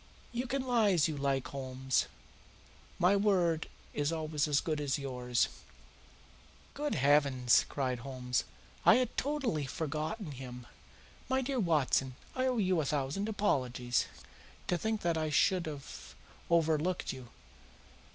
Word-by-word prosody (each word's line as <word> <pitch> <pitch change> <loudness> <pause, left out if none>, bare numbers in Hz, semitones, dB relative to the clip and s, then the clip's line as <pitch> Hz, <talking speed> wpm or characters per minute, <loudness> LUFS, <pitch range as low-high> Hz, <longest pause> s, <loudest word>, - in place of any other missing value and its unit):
You 245 +2 -2
can 265 +2 -1
lie 235 -5 +3
as 170 -3 +4
you 155 - -3
like, 140 -2 -1
Holmes. 130 -1 -1 0.9
My 180 +3 +4
word 180 -6 +2 0.3
is 145 +1 0
always 155 -2 -1
as 145 -2 +3
good 155 -2 -2
as 140 -1 0
yours." 125 -3 0 1.3
"Good 295 +1 -2
heavens!" 140 -3 +4
cried 130 -3 -1
Holmes. 125 -1 -2 0.4
"I - - +8
had 250 -1 0
totally 260 - -1
forgotten 155 - -3
him. 125 -2 -8 0.6
My 265 0 +2
dear 265 0 -1
Watson, 145 - +2 0.2
I 255 0 0
owe 255 -1 +1
you 185 -5 +2
a - - -2
thousand 145 +9 -1
apologies. 125 - 0 0.6
To 180 - +1
think 220 +4 -1
that 170 -2 +1
I 155 -1 -1
should 175 +4 +3
have 145 -3 -8 0.3
overlooked 165 +1 +2
you! 130 -2 -9
155 Hz, 135 wpm, -32 LUFS, 135-200 Hz, 1.3 s, I